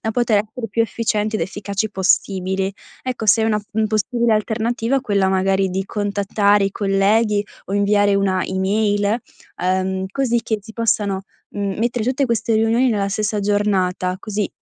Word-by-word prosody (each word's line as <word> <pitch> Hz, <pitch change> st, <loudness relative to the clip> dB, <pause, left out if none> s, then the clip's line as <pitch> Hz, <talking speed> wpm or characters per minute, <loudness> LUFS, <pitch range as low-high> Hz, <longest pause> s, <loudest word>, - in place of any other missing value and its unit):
da 220 Hz, -, -2 dB
poter 235 Hz, -2 st, +2 dB
essere 220 Hz, +3 st, -4 dB
più 230 Hz, +3 st, +1 dB
efficienti 215 Hz, -1 st, -1 dB
ed -, -, -2 dB
efficaci 200 Hz, +3 st, -3 dB
possibili. 190 Hz, 0 st, +1 dB, 0.3 s
Ecco, 255 Hz, -3 st, -3 dB
se 220 Hz, +2 st, +5 dB
è -, -, +2 dB
una 215 Hz, -1 st, +1 dB
m 220 Hz, -1 st, +2 dB
possibile 225 Hz, +2 st, +1 dB
alternativa, 230 Hz, +4 st, 0 dB
quella, 200 Hz, -6 st, +1 dB
magari, 190 Hz, 0 st, +1 dB
di 190 Hz, +1 st, -2 dB
contattare 205 Hz, 0 st, +1 dB
i 195 Hz, -, 0 dB
colleghi, 205 Hz, +1 st, +2 dB, 0.2 s
o 195 Hz, -, -6 dB
inviare 205 Hz, 0 st, +3 dB
una 190 Hz, -2 st, +1 dB
email, 205 Hz, +2 st, +1 dB, 0.5 s
ehm, 190 Hz, +1 st, 0 dB
così 240 Hz, -1 st, 0 dB
che 220 Hz, -2 st, -1 dB
ti 210 Hz, +2 st, -13 dB
possano, 210 Hz, -4 st, 0 dB, 0.3 s
mhmm, 200 Hz, -1 st, -3 dB
mettere 235 Hz, -1 st, 0 dB
tutte 265 Hz, +2 st, +1 dB
queste 230 Hz, -1 st, 0 dB
riunioni 225 Hz, +4 st, +3 dB
nella 200 Hz, -2 st, 0 dB
stessa 210 Hz, +1 st, -1 dB
giornata, 195 Hz, -3 st, 0 dB
così, 210 Hz, -2 st, -3 dB
205 Hz, 160 wpm, -20 LUFS, 195-225 Hz, 0.5 s, se